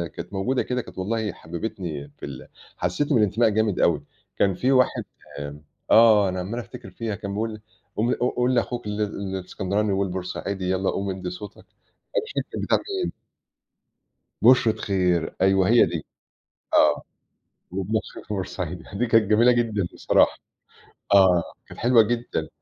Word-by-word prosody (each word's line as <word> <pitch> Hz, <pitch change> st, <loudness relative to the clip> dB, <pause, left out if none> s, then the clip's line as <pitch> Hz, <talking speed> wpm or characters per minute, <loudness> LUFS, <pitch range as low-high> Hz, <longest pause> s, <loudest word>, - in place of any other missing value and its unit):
كانت 90 Hz, +3 st, -8 dB
موجودة 125 Hz, +7 st, 0 dB
كده 125 Hz, 0 st, -2 dB
كانت 90 Hz, -3 st, -14 dB
والله 105 Hz, +2 st, -1 dB
حببتني 80 Hz, -5 st, -6 dB
في -, -, -6 dB
ال 70 Hz, -3 st, -8 dB, 0.3 s
حسّستني 140 Hz, -, 0 dB
بالإنتماء 110 Hz, +2 st, +3 dB
جامد 110 Hz, -2 st, +1 dB
أوي 75 Hz, -4 st, +2 dB, 0.4 s
كان 95 Hz, -2 st, +3 dB
في 130 Hz, +2 st, +1 dB
واحد 130 Hz, -1 st, +3 dB, 0.4 s
آآ، 70 Hz, +1 st, -7 dB, 0.3 s
آه 110 Hz, -4 st, +7 dB
أنا 90 Hz, 0 st, -3 dB
عمّال 105 Hz, +7 st, -4 dB
أفتكر 100 Hz, -3 st, -9 dB
فيها 110 Hz, +1 st, -4 dB
كان 100 Hz, -2 st, -6 dB
بيقول 110 Hz, 0 st, -3 dB, 0.4 s
قوم 115 Hz, +3 st, +2 dB
قو 125 Hz, -, 0 dB
قول 125 Hz, +1 st, +1 dB
لأخوك 120 Hz, -1 st, -1 dB
ال 105 Hz, +1 st, -2 dB
الإسكندراني 100 Hz, +1 st, -2 dB
والبورسعيدي 95 Hz, 0 st, -3 dB
يلّا 95 Hz, +1 st, 0 dB
قوم 100 Hz, 0 st, -2 dB
إدّي 95 Hz, -1 st, -4 dB
صوتك، 100 Hz, +3 st, -8 dB
أنا -, -, -17 dB, 0.6 s
مش -, -, -9 dB
فاكر -, -, -2 dB
كانت -, -, -3 dB
بتاع -, -, +3 dB, 0.3 s
مين. -, -, -3 dB, 1.3 s
بُشرة 125 Hz, -3 st, +6 dB
خير 90 Hz, -4 st, 0 dB
أيوه، 95 Hz, 0 st, +4 dB
هي 120 Hz, +1 st, +6 dB
دي. 80 Hz, -3 st, -4 dB, 0.7 s
آه، -, -, +4 dB, 0.7 s
وابن 95 Hz, +4 st, -2 dB
أخوك -, -, -9 dB
البورسعيدي 90 Hz, -4 st, -4 dB
دي 120 Hz, +5 st, 0 dB
كانت 115 Hz, -1 st, +4 dB
جميلة 120 Hz, +3 st, +6 dB
جدًا 110 Hz, -6 st, 0 dB
بصراحة، -, -, +3 dB, 0.8 s
آه 90 Hz, -3 st, +6 dB, 0.2 s
كانت -, -, -12 dB
حلوة 120 Hz, 0 st, +6 dB
جدًا. 120 Hz, +2 st, -2 dB
100 Hz, 155 wpm, -24 LUFS, 90-115 Hz, 1.3 s, آه